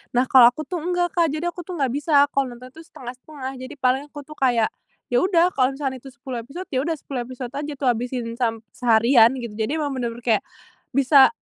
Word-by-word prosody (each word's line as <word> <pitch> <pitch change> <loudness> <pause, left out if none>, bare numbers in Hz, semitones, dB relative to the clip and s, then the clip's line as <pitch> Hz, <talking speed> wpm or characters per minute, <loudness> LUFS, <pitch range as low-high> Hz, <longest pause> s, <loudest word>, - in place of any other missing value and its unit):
Nah, 250 - +4
kalo 250 -3 +8
aku 310 - -6
tuh 360 - -3
enggak, 355 0 0
Kak. 340 -1 +3
Jadi 315 +3 -3
aku 350 0 -8
tuh 365 - -5
nggak 265 -3 +1
bisa, 285 0 +3
kalo 270 -3 -1
nonton 250 +1 -12
itu 320 - -13
setengah-setengah. 260 +2 -8
Jadi 260 +3 -8
paling 260 +2 +2
aku 290 - -8
tuh, 305 +2 -13
kayak, 240 -4 +2 0.4
ya 245 - +2
udah 355 -2 +4
kalo 260 +1 +3
misalkan 270 -2 -3
itu 270 - -14
10 260 -3 -6
episod, 345 +8 -7
ya 260 - -1
udah 330 - 0
10 260 -4 -5
episod 255 -1 -6
aja 290 +1 -4
tuh, 265 -1 -2
habisin, 240 0 -4
sam 225 -2 0
seharian, 235 +1 +4
gitu. 235 -2 -6
Jadi, 225 +7 -1
emang 290 - -1
bener-bener 240 -1 -4
kayak, 225 -3 +1 0.5
bisa 275 0 +7
260 Hz, 220 wpm, -23 LUFS, 245-295 Hz, 0.5 s, kalo